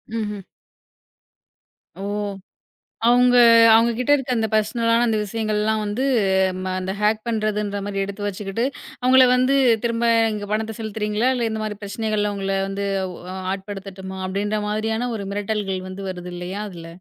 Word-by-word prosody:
ம்ஹ்ம். 210 Hz, -3 st, -3 dB, 1.5 s
ஓ! -, -, -10 dB, 1.1 s
அவங்க 245 Hz, +1 st, +5 dB, 0.4 s
அவங்க 230 Hz, +1 st, +5 dB
கிட்ட 255 Hz, +3 st, +1 dB
இருக்க 270 Hz, -2 st, -3 dB
அந்த 225 Hz, -1 st, +1 dB
பர்சனலான 230 Hz, +2 st, +2 dB
அந்த 220 Hz, -1 st, +1 dB
விஷயங்கள்லாம் 215 Hz, 0 st, -1 dB
வந்து 205 Hz, +6 st, -2 dB, 0.8 s
அந்த 185 Hz, +1 st, -3 dB
ஹேக் 215 Hz, +1 st, +1 dB
பண்றதுன்றது 210 Hz, -2 st, -1 dB
மாரி 195 Hz, -1 st, -2 dB
எடுத்து 200 Hz, +1 st, -5 dB
வச்சிக்கிட்டு, 205 Hz, +3 st, -3 dB, 0.4 s
அவங்கள 255 Hz, +1 st, +6 dB
வந்து 255 Hz, +2 st, +3 dB, 0.3 s
திரும்ப 235 Hz, 0 st, 0 dB, 0.3 s
இங்க 205 Hz, -1 st, -5 dB
பணத்த 220 Hz, +1 st, -1 dB
செலுத்துறீங்களா? 220 Hz, +2 st, -1 dB
இல்லா 235 Hz, -2 st, 0 dB
இந்த 220 Hz, 0 st, -3 dB
மாரி 210 Hz, -1 st, -4 dB
பிரச்சனைகள்ல 210 Hz, 0 st, -1 dB
உங்கள 195 Hz, 0 st, -2 dB
வந்து 200 Hz, +1 st, -3 dB, 0.3 s
உ -, -, -10 dB, 0.4 s
ஆட்படுத்தட்டுமா 190 Hz, -1 st, -7 dB
அப்படின்ற 205 Hz, +3 st, -1 dB
மாரியான 220 Hz, +3 st, -1 dB
ஒரு 200 Hz, -2 st, -5 dB
மிரட்டல்கள் 200 Hz, -2 st, -2 dB
வந்து 190 Hz, +1 st, -7 dB
வருது 180 Hz, -1 st, -7 dB
இல்லையா 180 Hz, +4 st, -5 dB
அதுல? 170 Hz, -3 st, -10 dB
210 Hz, 140 wpm, -22 LUFS, 200-225 Hz, 1.5 s, அவங்கள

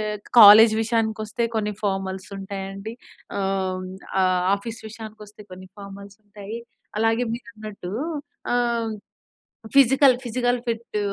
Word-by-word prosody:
ఎక్ 205 Hz, -, -14 dB
కాలేజ్ 215 Hz, +2 st, +9 dB
విషయానికొస్తే 220 Hz, 0 st, -1 dB
కొన్ని 210 Hz, -1 st, -1 dB
ఫార్మల్స్ 190 Hz, -1 st, -3 dB
ఉంటాయండి. 195 Hz, +2 st, -7 dB, 0.4 s
ఆహ్, 190 Hz, -1 st, -1 dB
హ్మ్, 185 Hz, 0 st, -8 dB, 0.3 s
ఆహ్, 185 Hz, -1 st, +2 dB
ఆఫీస్ 230 Hz, +3 st, -8 dB
విషయానికొస్తే, 215 Hz, -1 st, -11 dB
కొన్ని 185 Hz, 0 st, -11 dB
ఫార్మల్స్ 200 Hz, 0 st, -11 dB
ఉంటాయి. 205 Hz, +1 st, -8 dB, 0.4 s
అలాగే 225 Hz, +2 st, +2 dB
మీరన్నట్టు 215 Hz, -6 st, -9 dB, 0.6 s
ఆహ్, 235 Hz, -2 st, 0 dB, 0.8 s
ఫిజికల్ 270 Hz, 0 st, +6 dB
ఫిజికల్ 245 Hz, +1 st, 0 dB
ఫిట్టు 230 Hz, -2 st, -3 dB
215 Hz, 110 wpm, -23 LUFS, 195-230 Hz, 0.8 s, కాలేజ్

